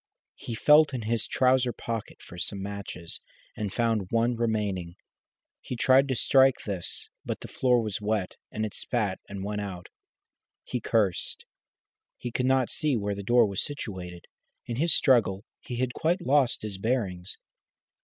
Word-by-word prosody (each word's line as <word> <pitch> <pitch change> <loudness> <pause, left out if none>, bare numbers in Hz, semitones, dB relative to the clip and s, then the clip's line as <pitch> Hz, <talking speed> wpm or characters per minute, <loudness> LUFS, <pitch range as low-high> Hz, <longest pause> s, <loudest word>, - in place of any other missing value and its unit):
He 115 - -5
felt 150 +3 +6
in 120 - -3
his 110 0 0
trouser 130 -1 +3
pocket 115 -2 -5
for 90 - -10
some 100 - -2
matches, 100 -4 -6 0.3
and 105 -2 -3
found 115 -4 +1
one 115 +1 +2
remaining. 105 -7 -1 0.7
He - - -5
tried 130 +3 +5
to 130 - 0
strike 135 +2 +5
this, 95 -4 -4 0.2
but - - -4
the - - -7
floor 125 -2 +2
was 105 -2 -3
wet, 105 -3 -1 0.2
and 110 0 -2
it 105 - -5
spat 105 -6 -1
and 100 -1 -5
went 105 +1 -2
out. 95 -3 -6 0.7
He 125 - -3
cursed. 105 -6 0 0.7
He 120 - -5
could 125 +2 0
not 130 -2 +3
see 150 -5 +1
where 100 -1 -1
the 100 - -5
door 120 +3 +5
was 100 -3 -1
situated. 95 - -6 0.4
In 120 - -4
his 165 +4 +2
struggle 115 -9 +3
he 125 - -6
had 125 0 -1
quite 170 +3 0
lost 135 -5 +3
his 100 -3 -5
bearings. 100 -6 -2
115 Hz, 165 wpm, -28 LUFS, 100-125 Hz, 0.7 s, felt